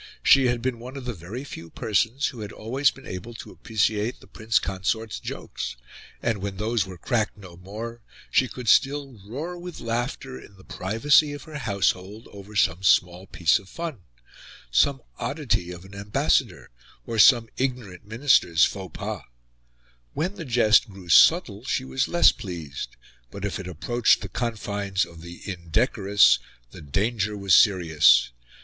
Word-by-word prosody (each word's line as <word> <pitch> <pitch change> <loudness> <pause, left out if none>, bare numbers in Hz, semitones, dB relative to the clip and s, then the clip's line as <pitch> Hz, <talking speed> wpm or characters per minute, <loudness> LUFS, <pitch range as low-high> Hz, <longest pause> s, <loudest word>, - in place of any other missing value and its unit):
She 135 -2 +6
had 120 -1 -1
been 125 -2 -2
one 125 +3 -9
of 130 - -8
the 125 - -3
very 100 +8 -8
few 85 - -9
persons 115 +9 0
who 125 - -11
had 105 -1 -6
always 130 +7 +1
been 135 - -12
able 110 +6 -7
to - - -9
appreciate 110 +1 -1
the - - -17
Prince 110 0 -1
Consort's 100 +4 -2
jokes; - - -6 0.5
and, 115 -4 0
when 100 0 -5
those 110 -1 0
were 95 -1 -9
cracked 110 +4 -1
no 95 -4 -12
more, 110 +6 -8 0.3
she 130 - +3
could 125 -1 -9
still 135 -2 +2
roar 155 - -6
with 175 -1 -8
laughter, 115 - -4
in 100 - -16
the 95 - -17
privacy 140 - +2
of 145 - -8
her 155 -2 -8
household, 100 -1 -1
over 100 +1 -12
some 90 -3 +2
small 90 -1 +2
piece 85 +4 +2
of 95 -2 -17
fun 165 - -6 0.7
some 135 - +2 0.2
oddity 135 - -1
of 90 +1 -10
an 95 - -14
ambassador, 100 -8 0 0.3
or 115 -1 -3
some 120 +1 +7
ignorant 125 -9 -3
Minister's 110 - +3
faux 95 -5 -6
pas. - - -4 0.9
When 175 +6 -1
the 170 -5 -8
jest 115 -2 +4
grew 95 -3 -12
subtle 115 - +5
she 130 -1 -1
was 130 0 -1
less 175 - +5
pleased; 80 - -7 0.3
but, 100 +8 -7
if 105 - -3
it 90 - -7
approached 115 +8 +1
the 100 - -6
confines 100 -3 -2
of 80 -1 -14
the 85 +1 -11
indecorous, 100 - +3 0.3
the - - -11
danger 105 +7 -1
was 100 -2 +1
serious. 80 - +5
105 Hz, 165 wpm, -25 LUFS, 95-125 Hz, 0.9 s, some